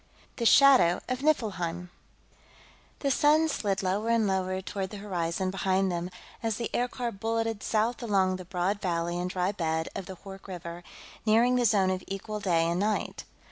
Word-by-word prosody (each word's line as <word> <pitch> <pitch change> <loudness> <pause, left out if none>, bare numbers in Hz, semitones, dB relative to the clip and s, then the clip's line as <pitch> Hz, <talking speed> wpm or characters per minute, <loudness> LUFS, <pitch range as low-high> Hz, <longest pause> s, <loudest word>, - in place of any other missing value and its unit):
The 235 -3 +2
Shadow 260 -12 +6
of 255 0 -2
Niflheim 180 - -1 1.1
The 275 - +1
sun 305 +3 +4
slid 200 -8 -1
lower 200 +5 0
and 230 -2 +3
lower 190 -1 0
toward 190 0 -4
the 210 - -8
horizon 185 -2 -2
behind 190 0 +1
them 175 +1 -3 0.3
as 225 -2 -1
the 235 - -3
aircar 245 0 -1
bulleted 225 +1 -2
south 225 +3 0
along 190 -5 +1
the 185 - -9
broad 185 +3 -1
valley 175 -1 -1
and 180 +1 -2
dry 180 +1 0
bed 160 -4 -2
of 190 - -5
the 190 - -7
Hoork 195 +1 -11
River, 175 -2 -7 0.4
nearing 230 +3 +4
the 245 -1 +2
zone 195 -4 +3
of 185 0 -3
equal 205 +2 -5
day 170 -5 +2
and 170 +1 0
night. 210 +1 -1
195 Hz, 175 wpm, -28 LUFS, 180-225 Hz, 1.1 s, Shadow